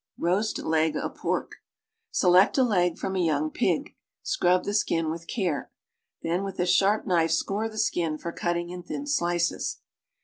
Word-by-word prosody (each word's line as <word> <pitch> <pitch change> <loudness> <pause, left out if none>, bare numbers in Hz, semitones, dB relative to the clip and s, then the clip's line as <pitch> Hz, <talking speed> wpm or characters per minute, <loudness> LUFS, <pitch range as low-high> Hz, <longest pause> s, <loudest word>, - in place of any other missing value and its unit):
ROAST 195 +6 0
LEG 160 0 +1
OF - - -3
PORK - - -3 0.5
Select 185 +5 +4
a 265 - +5
leg 180 -7 +2
from 190 - -3
a - - 0
young 155 -1 +1
pig. - - -1 0.3
Scrub 180 +1 +2
the 205 - -3
skin 165 -6 +1
with 165 +1 -7
care. 180 - -2 0.5
Then 175 +3 0
with 195 -1 -6
a 175 - +2
sharp 195 +4 +3
knife 170 -3 +2
score 210 +6 0
the 215 - -11
skin 170 -7 0
for 170 - -5
cutting 175 0 -2
in 180 0 -6
thin 280 +10 -5
slices. 175 - 0
175 Hz, 170 wpm, -26 LUFS, 170-200 Hz, 0.5 s, a